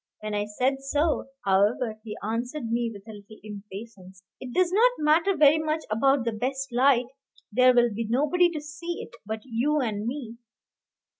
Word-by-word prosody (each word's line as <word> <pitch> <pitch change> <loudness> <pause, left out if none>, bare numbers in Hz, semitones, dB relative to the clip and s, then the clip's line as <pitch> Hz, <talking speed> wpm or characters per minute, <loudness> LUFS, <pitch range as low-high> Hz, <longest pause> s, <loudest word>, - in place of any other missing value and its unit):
When 215 0 -4
I 205 0 0
said 255 +6 0
so, 295 +3 0 0.2
however, 210 +3 +1
he 215 -2 -7
answered 235 +3 -3
me 235 0 0
with 200 0 -12
a - - -8
little 210 +1 -13
impatience, 200 -2 -10 0.2
"It 255 - -8
does 360 +4 +2
not 460 +6 +5
matter 325 +5 +2
very 305 +1 +6
much 310 0 -1
about 270 +3 +2
the 230 - 0
best 265 +4 -3
light; 250 0 +4 0.5
there 255 +3 +5
will 240 -2 +3
be 225 +1 -3
nobody 300 +8 +3
to 315 -3 -5
see 325 +3 -6
it - - -17
but 220 0 -4
you 265 +5 0
and 220 -4 -2
me. 240 -3 -5
245 Hz, 175 wpm, -26 LUFS, 215-295 Hz, 0.5 s, very